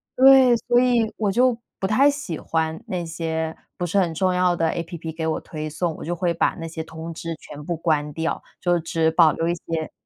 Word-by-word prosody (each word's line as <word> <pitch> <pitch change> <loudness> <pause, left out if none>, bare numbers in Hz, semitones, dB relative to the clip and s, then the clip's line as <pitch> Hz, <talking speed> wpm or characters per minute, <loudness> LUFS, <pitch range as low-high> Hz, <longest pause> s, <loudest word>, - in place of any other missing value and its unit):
对， 260 -2 +7
所 240 +1 +2
以 240 -3 +2
我 205 -3 +1
就 245 +2 +3 0.2
不 190 - 0
太 260 +7 +4
喜 280 - -1
欢 160 0 -2
那 180 -2 -3
些 160 -1 -3 0.2
不 175 - -2
是 190 - -1
很 175 -4 +2
重 185 +3 +1
要 180 -1 +2
的 165 -1 +1
APP 165 -1 -5
给 160 - -2
我 160 - 0
推 155 -1 -6
送， 160 +2 -2
我 - - -8
就 175 +1 -2
会 170 -1 0
把 - - +3
那 165 - -5
些 160 0 -5
通 160 +1 -8
知 165 0 -5
全 145 0 -10
部 175 - -2
关 155 -3 0
掉， 160 +2 -2 0.2
就 175 -1 +2
只 160 0 +1
保 160 -2 +5
留 165 - -2
一 170 - +1
些 165 -1 -4
165 Hz, 250 characters per minute, -23 LUFS, 160-190 Hz, 0.2 s, 对